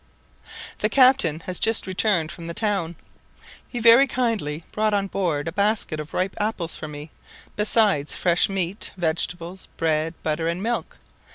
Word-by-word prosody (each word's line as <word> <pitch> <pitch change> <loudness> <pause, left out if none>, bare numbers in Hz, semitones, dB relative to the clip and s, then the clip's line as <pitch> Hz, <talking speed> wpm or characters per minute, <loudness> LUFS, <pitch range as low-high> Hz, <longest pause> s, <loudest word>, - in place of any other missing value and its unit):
] - - -32 0.3
The - - +1
captain 255 - +4
has 180 +2 0
just 225 -1 +3
returned 185 -4 0
from 170 -1 -9
the 170 - -6
town. 195 -6 -1 0.7
He 245 - -7
very 235 +4 +7
kindly 215 - -2
brought 215 -1 +1
on 200 -1 0
board 170 -7 -2
a - - -2
basket 200 -4 0
of 150 0 -7
ripe 185 +1 -1
apples 205 -6 -1
for 155 - -7
me, 150 +1 -9 0.4
besides 210 -8 +2
fresh 175 +1 +2
meat, 195 +1 -2
vegetables, 175 +2 -2
bread, 160 0 0
butter, 160 +1 -1
and 170 +3 -2
milk. 235 +1 -3
180 Hz, 160 wpm, -23 LUFS, 165-215 Hz, 0.7 s, very